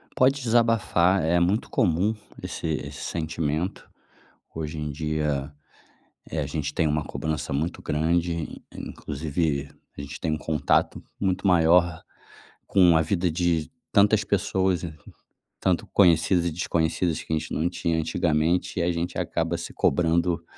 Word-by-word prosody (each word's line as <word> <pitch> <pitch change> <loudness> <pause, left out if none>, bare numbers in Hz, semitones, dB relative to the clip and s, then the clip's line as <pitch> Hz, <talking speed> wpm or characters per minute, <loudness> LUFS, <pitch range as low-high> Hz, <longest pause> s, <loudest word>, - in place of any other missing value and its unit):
Pode 135 +2 +3
desabafar, 110 -7 +3
é 85 +2 +3
muito 95 +6 +1
comum 100 - +2 0.3
esse - - -5
esse 70 -2 -4
sentimento, 80 +1 -3 0.6
hoje 80 -1 -5
em 75 0 -3
dia, 75 -2 -2 0.8
eh, 80 - -3
a 70 - -2
gente 75 0 -3
tem 80 +1 +1
uma 75 0 0
cobrança 80 -2 -3
muito 80 +5 -2
grande, 85 +2 -1
in - - -7
inclusive 75 -1 -2 0.3
a - - -5
gente 70 0 -7
tem 80 - -1
um 75 - -1
contato 80 -1 0 0.2
muito 95 0 0
maior 85 -1 +4 0.6
com 90 -4 +5
a 80 - +4
vida 90 +2 0
de 85 -2 0 0.2
tantas 105 +1 +4
pessoas 95 -2 +1
e 80 - -5
co 75 - -17 0.5
tanto 90 -3 +1
conhecidas 85 -1 +4
e - - +1
desconhecidas 85 0 0
que - - -7
a 80 - +3
gente - - -7
não 80 +3 +1
tinha 85 -2 -1
antigamente, 80 +2 0
e - - +2
a 85 - +1
gente 85 +1 -3
acaba - - -1
se - - -7
cobrando 85 +2 +1
85 Hz, 150 wpm, -25 LUFS, 75-90 Hz, 0.8 s, com